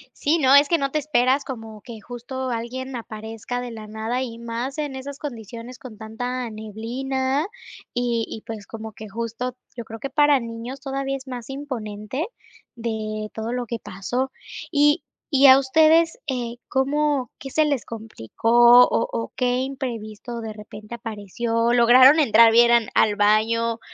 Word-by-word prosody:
Sí, 315 +4 +1
no, 265 -2 +4
es 285 +1 +7
que 335 - +3
no 275 -3 -2
te 305 - +1
esperas 270 -2 +2
como 225 -4 -8
que 225 -1 -10
justo 250 +3 -6
alguien 250 +3 -4
aparezca 225 +1 -6
de 245 -1 -6
la 215 -1 -9
nada 220 +4 -3
y 230 -3 -5
más 235 +4 -4
en 290 -3 -3
esas 275 +1 -7
condiciones 235 -2 -8
con 235 -5 -11
tanta 245 +2 -4
neblina 260 - -2 0.5
y 240 -2 0
y 220 - -7
pues 215 -3 -7
como 220 -1 -7
que 215 +1 -10
justo 230 +4 -4 0.2
yo 235 -2 -6
creo 225 0 -9
que 275 - -4
para 290 0 +4
niños 235 +3 -7
todavía 275 -1 -3
es 270 0 -9
más 245 -1 -7
imponente 255 - -5 0.5
de 215 -2 -4
todo 225 +2 -4
lo 250 -1 -2
que 235 0 -4
pasó. 210 +7 -3 0.4
Y 295 +1 +3 0.3
y 275 +1 +7
a 260 0 +10
ustedes, 315 +4 +4
eh, 245 -3 -3
¿cómo, 275 -1 0
qué 270 - -7
se 310 - +3
les 285 -5 -1
complicó 230 - +4
o 230 - 0
o 230 - -3
qué 250 0 +1
imprevisto 240 -3 -5
de 220 -1 -5
repente 210 +1 -10
apareció? 230 +1 -2
¿Lograron 255 +5 +7
entrar 230 -4 +6
bien 235 +1 +6
al 235 -3 +4
al 210 -1 +4
baño? 225 +2 +2
240 Hz, 165 wpm, -23 LUFS, 225-265 Hz, 0.5 s, a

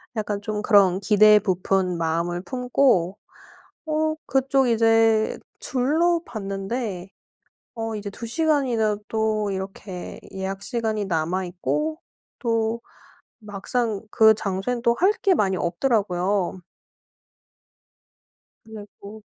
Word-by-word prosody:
약간 210 -1 -2
좀 210 0 -3
그런 195 -4 +4
기대에 210 +1 +6
부푼 185 -2 0
마음을 170 +2 -1
품고 250 -7 +1 0.7
어 310 0 0
그쪽 270 0 +2
이제 225 -1 +3 0.2
둘러 320 +7 +1
봤는데 195 -1 -4 0.7
어 225 -1 -3
이제 205 -1 -5
2 230 - -8
시간이나 250 -7 +1
또 215 -2 0
이렇게 190 -1 -6
예약 195 0 -4
시간이 220 -3 -2
남아있고 185 - -2 0.4
또 230 -1 0 0.6
막상 215 +1 -3
그 220 0 +6
장소엔 205 +5 -3
또 235 -1 +3
할 385 +4 +5
게 385 -2 +4
많이 190 - +1
없더라고요. 185 -1 0 2.0
그래서 215 -1 -12
215 Hz, 200 characters per minute, -23 LUFS, 195-235 Hz, 2.0 s, 기대에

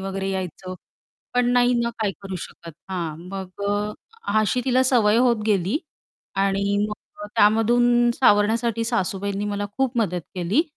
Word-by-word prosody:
वगैरे 195 0 -3
यायचं, 185 -1 -5 0.6
पण 245 0 +3
नाही 245 0 +4
ना 235 0 0
काय 215 -3 0
करू 195 -1 -5
शकत. 170 -1 -12 0.2
हां, 170 -5 -3
मग 190 0 -7
अ, - - +2 0.6
अ 215 +2 +3
अशी 215 +4 +1
तिला 255 0 +3
सवय 230 -5 +3
होत 235 -3 +3
गेली 200 - +1 0.6
आणि 195 +1 +1
मग 210 - -4 0.3
अ, - - -5
त्यामधून 240 +3 +4
सावरण्यासाठी 230 0 +2
सासूबाईंनी 200 -3 -1
मला 205 0 -2
खूप 265 -2 0
मदत 180 -6 0
केली 185 - +1
205 Hz, 150 wpm, -23 LUFS, 195-240 Hz, 0.6 s, नाही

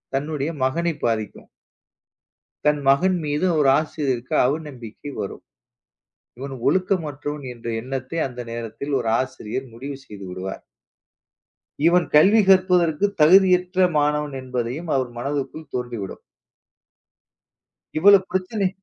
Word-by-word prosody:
தன்னுடைய 145 +1 -2
மகனை 165 +6 0
பாதிக்கும். 110 -3 -3 1.2
தன் 150 0 +3
மகன் 180 +7 +4
மீது 150 +4 0
ஒரு 135 -2 +4
ஆசிரியருக்கு 135 -6 -3
அவநம்பிக்கை 140 -2 -5
வரும். 100 - -5 1.0
இவன் 135 0 -6
ஒழுக்கமற்றவன் 150 -4 -1
என்ற 120 -1 -10
எண்ணத்தை 135 +5 -4
அந்த 125 -1 -7
நேரத்தில் 115 +5 -5
ஒரு 115 -2 -1
ஆசிரியர் 130 0 -5
முடிவு 135 +3 -7
செய்துவிடுவார். 95 -2 -7 1.2
இவன் 175 0 +4
கல்வி 195 +9 +6
கற்பதற்கு 180 -2 +4 0.2
தகுதியற்ற 180 +2 +5
மாணவன் 150 -1 0
என்பதையும் 130 +5 -4
அவர் 130 -2 -1
மனதுக்குள் 140 +3 -4
தோன்றி 120 -2 -3
விடும். 95 - -8 1.8
இவ்வளவு 190 +2 +6
பிரச்சனை 190 +2 0
145 Hz, 100 wpm, -22 LUFS, 125-170 Hz, 1.8 s, கல்வி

